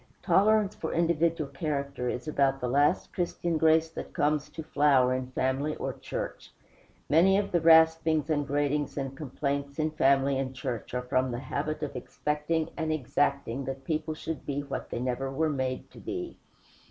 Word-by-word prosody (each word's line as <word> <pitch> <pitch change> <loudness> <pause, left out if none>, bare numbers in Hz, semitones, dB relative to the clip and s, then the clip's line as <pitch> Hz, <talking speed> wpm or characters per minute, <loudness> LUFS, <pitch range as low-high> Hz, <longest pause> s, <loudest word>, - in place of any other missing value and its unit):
Tolerance 210 0 +4
for 160 - -4
individual 165 -2 +1
character 140 -3 -2
is 125 +6 -4
about 135 -3 +2
the 125 - -2
last 145 +7 +2
Christian 170 -2 -1
grace 160 0 +4
that - - -7
comes 150 0 +1
to 160 - -7
flower 140 -4 +3
in 130 0 -2
family 130 +4 -1
or - - -3
church. - - -6 0.6
Much 185 +6 +5
of 200 0 -1
the 175 - +2
raspings, 160 -2 +5
and 145 -3 0
gratings, 145 +1 0
and 135 -1 -3
complaints 140 0 -3
in 155 0 0
family 140 -2 +3
and 130 -1 -3
church 125 -2 -4
are 125 - -1
from 130 +1 +1
the 120 - -3
habit 145 +4 -3
of 145 - -4
expecting 150 +5 -2
and 160 -1 -1
exacting 140 -2 0
that 135 +1 -5
people 155 +1 -2
should 160 0 -5
be 140 0 -2
what 140 -1 -5
they - - -4
never 130 +2 -2
were 155 +3 0
made 130 -2 -3
to - - -13
be. 360 -2 -5
145 Hz, 175 wpm, -28 LUFS, 135-160 Hz, 0.6 s, Much